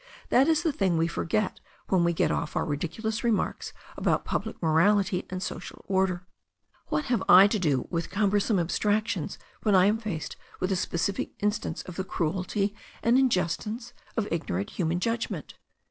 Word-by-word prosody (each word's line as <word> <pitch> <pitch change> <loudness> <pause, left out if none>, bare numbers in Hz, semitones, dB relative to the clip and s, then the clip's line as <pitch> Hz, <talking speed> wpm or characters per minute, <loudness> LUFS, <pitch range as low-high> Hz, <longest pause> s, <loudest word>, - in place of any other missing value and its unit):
That 265 +3 +5
is 320 0 +3
the 325 -4 +1
thing 190 -8 +1
we 165 - +3
forget 185 +4 -1 0.3
when 185 -3 +3
we 170 - +3
get 165 - +1
off 165 -2 -2
our - - +1
ridiculous 200 +9 -3
remarks 230 -3 0 0.2
about - - 0
public - - -3
morality 185 +4 +2
and 185 0 -4
social - - -7
order. 190 -2 +1 0.6
What 300 - -1
have 245 -2 +1
I 185 +2 +10
to 205 +1 +1
do 145 -8 +1
with 170 -1 -2
cumbersome 205 +1 +2
abstractions 205 +2 0 0.2
when 210 -3 +3
I 185 0 +6
am 210 +3 +3
faced 200 -9 -5 0.2
with 185 +1 -1
a - - +2
specific 185 +2 -1
instance 210 +1 -1
of 180 -2 -9
the 190 - -1
cruelty 190 +4 -1 0.3
and 235 +2 +4
injustice 230 0 0 0.2
of 215 -2 0
ignorant 100 - -2
human 175 -1 -1
judgment? 230 +4 -2
190 Hz, 165 wpm, -27 LUFS, 170-215 Hz, 0.6 s, I